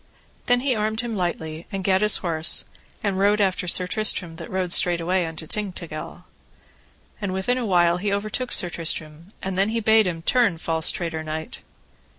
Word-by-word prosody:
Then 245 Hz, 0 st, +3 dB
he 260 Hz, -2 st, +1 dB
armed 215 Hz, +1 st, -1 dB
him 235 Hz, -2 st, -4 dB
lightly, 165 Hz, -3 st, -3 dB
and 195 Hz, -1 st, -4 dB
gat 190 Hz, 0 st, +2 dB
his 210 Hz, 0 st, +5 dB
horse, 165 Hz, -2 st, +1 dB, 0.4 s
and 200 Hz, -2 st, 0 dB
rode 205 Hz, +2 st, +3 dB
after 190 Hz, -2 st, +1 dB
Sir 180 Hz, +1 st, +3 dB
Tristram 180 Hz, -4 st, -1 dB
that -, -, -8 dB
rode 185 Hz, -2 st, -2 dB
straightway 175 Hz, 0 st, +3 dB
unto 160 Hz, 0 st, -6 dB
Tintagil. 175 Hz, -5 st, -5 dB, 1.0 s
And 200 Hz, -2 st, -2 dB
within 245 Hz, +7 st, 0 dB
a 235 Hz, -, -2 dB
while 175 Hz, -2 st, +3 dB
he 200 Hz, +2 st, -2 dB
overtook 215 Hz, +5 st, -2 dB
Sir 175 Hz, -, +3 dB
Tristram, 160 Hz, -1 st, -3 dB, 0.2 s
and 190 Hz, 0 st, -2 dB
then 200 Hz, +2 st, +2 dB
he 230 Hz, +1 st, -1 dB
bade 220 Hz, -1 st, +4 dB
him, 165 Hz, -2 st, -4 dB
Turn, 230 Hz, -5 st, +3 dB
false 160 Hz, -1 st, +3 dB
traitor 165 Hz, -2 st, -2 dB
knight. 155 Hz, 0 st, -6 dB
185 Hz, 175 wpm, -23 LUFS, 165-210 Hz, 1.0 s, his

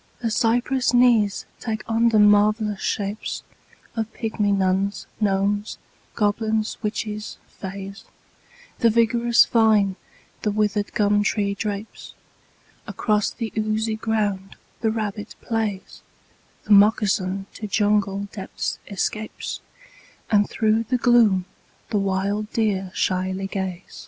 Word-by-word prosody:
The 230 Hz, -1 st, -2 dB
cypress 245 Hz, +3 st, +1 dB
knees 235 Hz, -5 st, +3 dB
take 220 Hz, -2 st, -4 dB
on 230 Hz, +1 st, +3 dB
them 215 Hz, -2 st, +5 dB
marvellous 210 Hz, 0 st, +3 dB
shapes 205 Hz, +1 st, -3 dB, 0.5 s
Of 225 Hz, -1 st, -2 dB
pygmy 215 Hz, -2 st, -1 dB
nuns, 195 Hz, +1 st, 0 dB
gnomes, 205 Hz, 0 st, 0 dB, 0.4 s
goblins, 215 Hz, +1 st, 0 dB
witches, 210 Hz, -1 st, -4 dB
fays, 195 Hz, +1 st, -8 dB, 0.7 s
The 230 Hz, -, +5 dB
vigorous 235 Hz, +1 st, +4 dB
vine 215 Hz, -4 st, +3 dB, 0.5 s
the 215 Hz, -, 0 dB
withered 210 Hz, 0 st, 0 dB
gum 205 Hz, 0 st, +3 dB
tree 200 Hz, -1 st, 0 dB
drapes, 205 Hz, +1 st, -6 dB, 0.7 s
Across 210 Hz, -2 st, 0 dB
the 230 Hz, -3 st, -5 dB
oozy 215 Hz, 0 st, 0 dB
ground 210 Hz, -3 st, -2 dB, 0.2 s
the 225 Hz, -, +1 dB
rabbit 215 Hz, -1 st, -4 dB
plays, 220 Hz, -4 st, -3 dB, 0.6 s
The 215 Hz, -, -6 dB
moccasin 200 Hz, -2 st, +3 dB
to 215 Hz, -, -6 dB
jungle 200 Hz, -1 st, +1 dB
depths 195 Hz, -3 st, -4 dB
escapes, 215 Hz, +2 st, -4 dB, 0.7 s
And 205 Hz, -1 st, +3 dB
through 220 Hz, +1 st, +1 dB
the 250 Hz, +3 st, 0 dB
gloom 230 Hz, -7 st, +4 dB, 0.5 s
the 210 Hz, -, +2 dB
wild 200 Hz, +2 st, -1 dB
deer 200 Hz, -4 st, 0 dB
shyly 185 Hz, +1 st, -1 dB
gaze. 190 Hz, -2 st, -5 dB
210 Hz, 110 wpm, -23 LUFS, 200-220 Hz, 0.7 s, them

